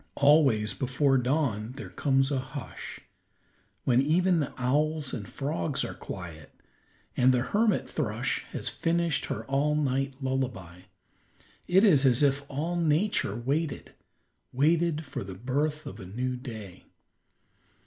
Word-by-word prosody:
Always, 140 -7 +4
before 135 +1 +2
dawn, 125 -4 0
there 135 0 -8
comes 135 -1 +1
a 135 - +1
hush, 130 +2 -7 0.8
when 125 0 +4
even 175 +4 +3
the 145 - -2
owls 145 +3 0
and 100 -4 -5
frogs 135 - -2
are - - -5
quiet, 85 -5 -8 0.7
and 125 +1 +5
the 125 -1 +2
hermit 215 +7 +1
thrush - - -1
has - - -4
finished 170 -1 0
her - - -4
all 140 +2 +1
night 135 -2 0
lullaby. 120 - -3 0.8
It 190 +3 +5
is 155 -11 +6
as 130 0 +4
if 140 0 +2
all 160 +5 -2
Nature 165 - +1
waited; 140 +5 -2 0.6
waited 160 +3 +2
for - - -5
the 95 -1 -8
birth 145 - -1
of 125 -6 -8
a 95 - -8
new 125 +6 -2
day. 110 -8 -9
135 Hz, 135 wpm, -28 LUFS, 125-155 Hz, 0.8 s, is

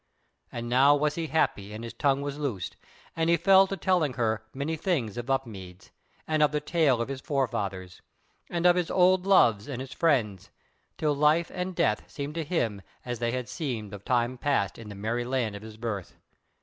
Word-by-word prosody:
And 120 0 -5
now 135 +4 +5
was 150 0 +1
he 165 0 -3
happy 105 -9 0
and 110 +2 -7
his 115 - -7
tongue 140 0 +1
was 145 0 -4
loosed, 120 - -3 0.4
and 165 0 +1
he 170 - +5
fell 195 +1 +6
to 195 - -4
telling 165 -5 +1
her 110 -3 -1
many 140 +4 -3
things 150 - -1
of 120 +2 -6
Upmeads, 100 -9 -4 0.4
and 155 -1 +1
of 150 -1 +4
the 150 - 0
tale 150 -5 +2
of - - -7
his 135 -1 -5
forefathers, 100 - -2 0.5
and 170 0 -2
of 175 0 +7
his 175 -2 0
old 185 +1 +3
loves 115 - +4
and 135 -4 -5
his 130 0 -7
friends, 115 - +1 0.5
till 150 -2 +1
life 150 +4 +3
and 180 0 -3
death 105 -7 0
seemed 145 +1 -5
to 165 0 -2
him 120 - -1 0.2
as 120 -2 -4
they 120 -1 0
had 125 -1 -3
seemed 120 -7 -4
of 100 -1 -8
time 125 +1 0
past 125 -10 0
in 110 -2 -9
the 100 - -8
merry 115 +4 -2
land 120 -4 -1
of 100 - -8
his 110 0 -11
birth. 110 -5 -5
130 Hz, 200 wpm, -27 LUFS, 110-155 Hz, 0.5 s, of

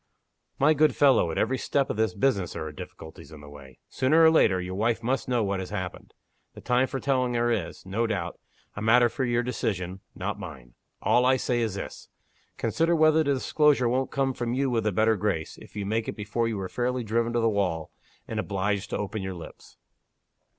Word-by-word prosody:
"My 150 +3 +4
good 155 +1 +3
fellow! 135 -11 +4
at 80 - -4
every 130 +3 +1
step 140 +2 0
of - - -3
this 110 +1 0
business 100 -5 +1
there - - -5
are 80 - -5
difficulties 80 +1 -11
in 80 - -11
the 75 - -13
way. 70 -3 -13
Sooner 150 +5 +3
or 160 - +7
later, 95 - +4
your 90 0 -5
wife 115 +3 0
must 130 +3 -1
know 120 -3 +2
what 100 -1 -1
has 95 - -5
happened. 95 -3 -6 0.4
The - - -10
time 125 +1 +2
for 135 - -4
telling 130 -2 0
her 120 0 +2
is, 100 -7 -3
no 110 +5 -1
doubt, 90 -6 -3 0.4
a 100 - -5
matter 120 +2 +5
for 130 - -3
your 120 0 +1
decision, 95 -6 -3 0.2
not - - -4
mine. 60 -2 -10 0.3
All 125 - +4
I 130 +1 +4
say 120 -2 0
is 110 -4 -1
this. 95 - -7 0.5
Consider 165 +1 +1
whether 155 0 +4
the 140 -2 +1
disclosure 140 -1 +3
won't 130 +2 0
come 135 -1 0
from 120 -1 -2
you 135 0 0
with 115 -2 0
a - - +2
better 110 +3 +3
grace, 95 -6 -2
if - - -15
you 105 -1 -3
make 110 +2 -1
it - - -4
before 105 +2 -1
you 110 -3 -2
are 95 - -3
fairly 125 +3 -2
driven 115 +2 0
to 120 - +2
the 115 - +2
wall, 95 -7 -1 0.4
and - - -3
obliged 100 0 -1
to - - -2
open 105 +1 -4
your 95 -1 -4
lips." 85 - -12
115 Hz, 220 wpm, -27 LUFS, 95-130 Hz, 0.5 s, or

